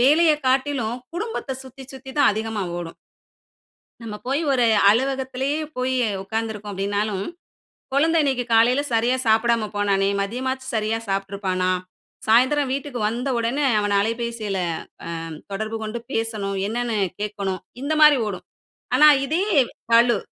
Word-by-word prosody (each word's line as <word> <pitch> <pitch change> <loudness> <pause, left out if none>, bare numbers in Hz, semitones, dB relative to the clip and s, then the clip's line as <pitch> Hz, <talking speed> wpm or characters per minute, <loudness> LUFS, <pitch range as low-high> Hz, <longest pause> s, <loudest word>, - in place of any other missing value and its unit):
வேலையை 305 +4 +5
காட்டிலும் 260 -3 +1 0.2
குடும்பத்தை 415 - -3
சுத்தி 265 +1 -11
சுத்தி 265 0 -10
தான் - - +6
அதிகமா 220 0 -3 0.2
ஓடும். 170 -1 -7 1.1
நம்ம 225 -2 -7
போய் 275 +4 0
ஒரு 250 -3 +3 0.2
அலுவலகத்திலேயே 265 +4 0 0.2
போய் 255 +1 0 0.3
உட்காந்துருக்கோம் 215 0 -4
அப்படின்னாலும், 200 0 -1 0.7
"குழந்தை 325 +4 +3
இன்னைக்கு 265 -4 0
காலையில 245 +5 +4
சரியா 235 +3 +2
சாப்பிடாம 225 0 +3
போனானே, 200 -1 +2
மதியமாச்சும் 260 +5 -3
சரியா 220 +1 0
சாப்பிட்டுருப்பானா? 195 -2 -1 0.6
சாயந்திரம் 260 +5 +4
வீட்டுக்கு 270 -2 -4
வந்த 240 +5 -3
உடன 240 +6 0 0.2
அவனை 205 -1 0
அலைபேசியில 230 -2 -2 0.2
அ - - -5 0.7
தொடர்பு 215 +3 -3
கொண்டு 220 +2 -4
பேசணும். 215 -3 -2
என்னன்னு 235 -1 -1 0.2
கேட்கணும்." 200 -3 -3 0.2
இந்த 310 +2 0
மாரி 300 -2 +8
ஓடும். 190 -3 -6 0.5
ஆனா 300 - +7 0.2
இதே 320 +7 0 0.5
பளு. 235 0 +5
230 Hz, 125 wpm, -23 LUFS, 210-265 Hz, 1.1 s, மாரி